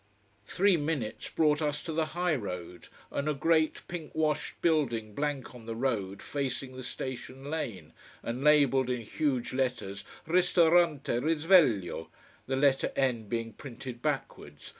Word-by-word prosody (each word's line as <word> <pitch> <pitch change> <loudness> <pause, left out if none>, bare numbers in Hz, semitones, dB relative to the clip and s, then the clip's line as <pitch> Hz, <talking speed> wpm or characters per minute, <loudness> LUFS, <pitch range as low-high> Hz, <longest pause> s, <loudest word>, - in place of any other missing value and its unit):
Three 195 -1 +3
minutes 145 -7 -2
brought 150 -1 +2
us 150 -1 -1
to 165 - -4
the 160 0 +1
high 175 -1 +2
road, 90 - -5 0.2
and 140 +2 -1
a 150 - 0
great, 160 +2 +2
pink 170 -4 -7
washed 155 -1 -1
building 120 -10 +1
blank 145 0 -2
on 120 -2 -12
the 115 - -3
road 105 -6 -2
facing 135 -2 -3
the 130 - -6
station 130 +2 -6
lane, 100 - -4 0.3
and 120 +3 -3
labelled 140 -4 +5
in 125 -1 -1
huge 130 +2 -1
letters: 125 -7 -2 0.2
RISTORANTE 170 -3 +4
RISVEGLIO: 145 - +3 0.4
the 135 - 0
letter 135 0 +3
N 125 -5 0
being 115 -1 -2
printed 125 0 -8
backwards. 135 - -4
135 Hz, 140 wpm, -30 LUFS, 120-155 Hz, 0.4 s, labelled